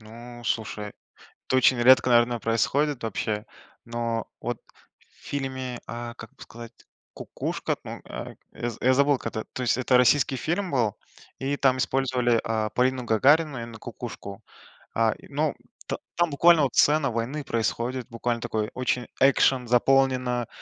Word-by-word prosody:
Ну, 120 +2 -11
слушай, 110 -2 -2 0.6
это 130 - +1
очень 130 0 +4
редко, 130 +1 +6
наверно, 120 0 +3
происходит 135 +5 0
вообще, 110 -1 -2 0.4
но 115 -1 -3
вот 120 -1 -3 0.4
в - - -27
фильме, 130 -3 -4
а, 120 0 -6
как 115 -2 -12
бы - - -15
сказать, 115 0 -11 0.4
"Кукушка" - - -3
ну, - - -7
э, - - -7 0.2
я 120 - -3
я 130 +1 +4
забыл 140 0 +3
как-то, 110 -1 -5
то 130 - -4
есть 125 - +1
это 130 0 +3
российский 130 +2 +4
фильм 175 +7 -2
был, 115 -6 +1 0.4
и 140 +2 -1
там 130 -2 +2
использовали, 125 -3 +1
а, 110 -1 -1
Полину 130 0 +1
Гагарину, 140 +6 +3
именно 115 -1 -8
"Кукушку". 115 -3 -8 0.5
А, 115 -1 +3
и - - -16
ну, 150 +1 -1 0.3
та - - -3 0.2
там 175 -1 +2
буквально 165 +2 +5
вот 130 - 0
сцена 145 -3 +4
войны 130 +6 -3
происходит, 120 +2 -2
буквально 115 0 -2
такой 110 -1 -2
очень 125 -1 -1
экшен 130 -2 +4
заполнена, 125 -1 +2
125 Hz, 150 wpm, -26 LUFS, 115-135 Hz, 0.6 s, редко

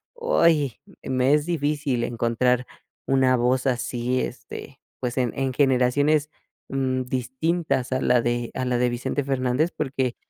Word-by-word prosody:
¡Uy!, 165 - +2 0.2
me 130 +2 +2
es 150 0 +2
difícil 145 -6 0
encontrar 120 +1 0 0.4
una 130 -1 +3
voz 125 +2 +1
así, 125 0 -1
este, - - -7 0.2
pues 125 0 -3
en 125 -3 +1
en 135 -1 -1
generaciones, 145 +3 +2 0.4
mm, 130 -1 -1
distintas 130 +3 -1
a 130 - 0
la 125 -1 +3
de 120 0 -1
a 130 - -2
la 125 -1 +1
de 125 0 +2
Vicente 125 +4 -2
Fernández 135 +4 0
porque, 130 -4 -1
130 Hz, 140 wpm, -24 LUFS, 125-145 Hz, 0.4 s, una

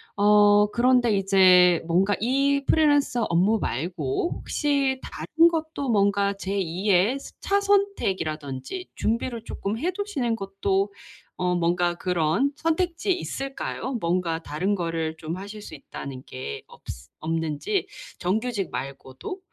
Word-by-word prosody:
어 205 0 +5
그런데 245 -2 +3
이제 185 -3 +5
뭔가 190 +4 +2
이 275 +4 +1
프리랜서 290 -6 +3
업무 190 +7 +3
말고 160 - -2
혹시 275 -3 0
다른 325 +2 +2
것도 315 -5 -3
뭔가 200 -1 +2
제2의 195 +4 0
스 - - -11
차선책 400 - +1
이라든지. 155 - -5
준비를 230 +1 -2
쪼끔 205 +3 -4
해 350 +5 0
두시는 335 - -2
것도 195 -1 -1 0.4
어 180 0 0
뭔가 175 0 +1
그런 180 - +1
선택지에 335 +3 0
있을까요? 270 -5 -3
뭔가 170 -1 0
다른 185 +7 -1
거를 165 -3 -3
좀 160 +1 -5
하실 205 +3 -8
수 - - -10
있다는 135 -2 -8
게 130 - -6
없스 - - -11
없는지 160 - -2 0.3
정규직 205 +1 -1
말고도? 135 - -6
200 Hz, 260 characters per minute, -25 LUFS, 175-270 Hz, 0.4 s, 어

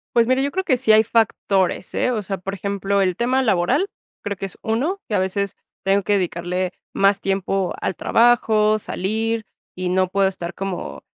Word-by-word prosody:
Pues, 235 0 +4
mira 255 +1 +3
yo 280 +1 0
creo 380 +1 -2
que 260 - +3
sí 245 -3 +2
hay 215 0 +7
factores, 200 -5 +1
¿eh? 250 - +1
O 220 -3 -1
sea 195 -1 -4
por 195 +2 -5
ejemplo 200 0 -1
el 185 -2 +1
tema 255 +3 +1
laboral, 245 - +2 0.3
creo 200 -1 -3
que 195 - -5
es 190 - -9
uno. 285 - -1
Que 210 - -1
a - - +3
veces 190 +1 -1 0.3
tengo 195 0 +2
que 205 - +1
dedicarle 180 0 -1 0.2
más 195 0 +3
tiempo 195 -1 -1
al 190 - -2
trabajo, 220 -2 +3
salir 220 +3 -2 0.3
y 185 0 -4
no 185 0 +1
puedo 195 0 +2
estar 175 -2 -5
como, 195 -2 -5
200 Hz, 195 wpm, -21 LUFS, 190-225 Hz, 0.3 s, hay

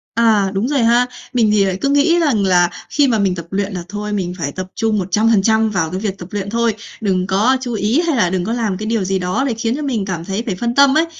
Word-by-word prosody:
À, 220 -4 +3
đúng 200 +5 -1
rồi 285 0 0
ha. 240 +2 +4 0.3
Mình 225 -4 +3
thì 205 -2 +3
lại 190 -1 -1
cứ 275 - +1
nghĩ 290 +5 +3
rằng 275 -11 +1
là 175 -2 +3 0.2
khi 290 -2 +2
mà 230 -4 +1
mình 195 -3 +1
tập 170 -2 -7
luyện 200 +1 -2
là 180 -2 -4
thôi, 210 +1 -4
mình 180 -3 -2
phải 145 -3 -2
tập 185 +4 -6
trung 220 -1 0
100% 220 +3 +2
vào 175 -6 -1
cái 185 - -3
việc 200 -2 -3
tập 175 - -9
luyện 200 -1 -4
thôi. 230 +1 +1 0.3
Đừng 185 -3 0
có 210 +7 +2
chú 245 -2 -4
ý 220 - +1
hay 320 - +1
là 180 -6 +2
đừng 180 -1 -2
có 225 - -2
làm 220 -6 -1
cái 215 - -5
điều 220 -2 0
gì 190 0 -1
đó 180 +8 -1
để 250 - 0
khiến 225 +1 -2
cho 300 - -5
mình 240 -8 -2
cảm 175 -4 -4
thấy 195 +4 -3
phải 200 -7 -2
phân 235 +5 -2
tâm 280 +1 +5
ấy. 320 - +3
210 Hz, 280 wpm, -17 LUFS, 190-235 Hz, 0.3 s, tâm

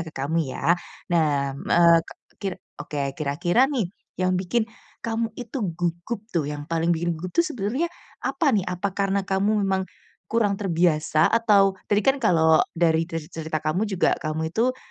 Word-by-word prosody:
ke 165 - -5
kamu 150 +2 0
ya. 160 +5 +1 0.4
Nah, 145 -4 +2
m 140 - -8
eee, 170 -1 +6
ke - - -10 0.3
kir 195 -3 -2 0.3
oke, 140 -2 -3
kira-kira 170 - +1
nih 255 -8 0 0.4
yang 185 0 +2
bikin 220 +5 0 0.3
kamu 225 0 -2
itu 240 +1 -5
gugup 175 +6 -3
tuh, 170 -8 -1
yang 145 +1 -5
paling 165 +1 +1
bikin 170 0 -1
gugup 175 +3 -6
tuh - - +4
sebenernya 255 - -1 0.3
apa 290 -6 +1
nih? 210 - +3
Apa 180 +2 -2
karena 195 0 0
kamu 200 +2 +1
memang 190 -1 0 0.4
kurang 210 -3 +1
terbiasa? 165 -4 +2
Atau 210 -4 +4 0.2
tadi 205 0 +2
kan 270 0 +3
kalau 160 -8 +4 0.2
dari 165 -1 +2
terz 165 -3 -6
cerita 160 -1 -4
kamu 180 +8 0
juga 190 -3 +2
kamu 160 +1 -3
itu, 250 +5 +1
180 Hz, 170 wpm, -24 LUFS, 160-210 Hz, 0.4 s, eee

